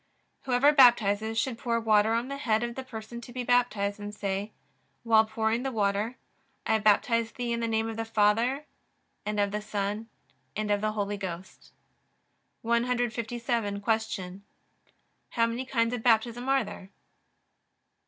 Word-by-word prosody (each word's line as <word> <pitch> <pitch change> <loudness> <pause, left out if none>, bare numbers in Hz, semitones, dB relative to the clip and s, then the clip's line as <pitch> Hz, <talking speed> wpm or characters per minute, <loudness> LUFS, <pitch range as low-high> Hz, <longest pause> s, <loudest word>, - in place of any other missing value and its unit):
Whoever 265 +3 +4
baptizes 225 -5 +4
should 230 0 -1
pour 235 -1 0
water 220 -1 +3
on 235 +2 0
the 275 +1 -5
head 220 -5 +1
of 235 0 -3
the 265 - -6
person 235 -1 -8
to 240 - -11
be 250 0 -4
baptized, 215 -5 +1
and 205 0 -7
say, 200 +1 -3 0.5
while 220 -1 +5
pouring 220 +1 -1
the 270 +1 -2
water: 210 +1 0 0.5
I 220 - +2
baptize 225 +2 +2
thee 245 -1 -3
in 235 - -2
the 230 - -1
name 225 0 0
of 225 -1 -5
the 225 - -1
Father, 225 +6 +2 0.6
and 210 0 -1
of 200 -1 +1
the 210 +1 -2
Son, 210 +1 -3 0.5
and 210 0 -2
of 205 0 +1
the 215 0 0
Holy 205 -1 -2
Ghost. 185 -1 -8 0.9
157. 235 -2 -1
Q. 205 -4 -2 0.9
How 230 - +2
many 235 +3 -3
kinds 230 -2 0
of 245 - -3
Baptism 235 +2 +2
are 270 -1 +3
there? 190 - -10
225 Hz, 155 wpm, -28 LUFS, 210-240 Hz, 0.9 s, while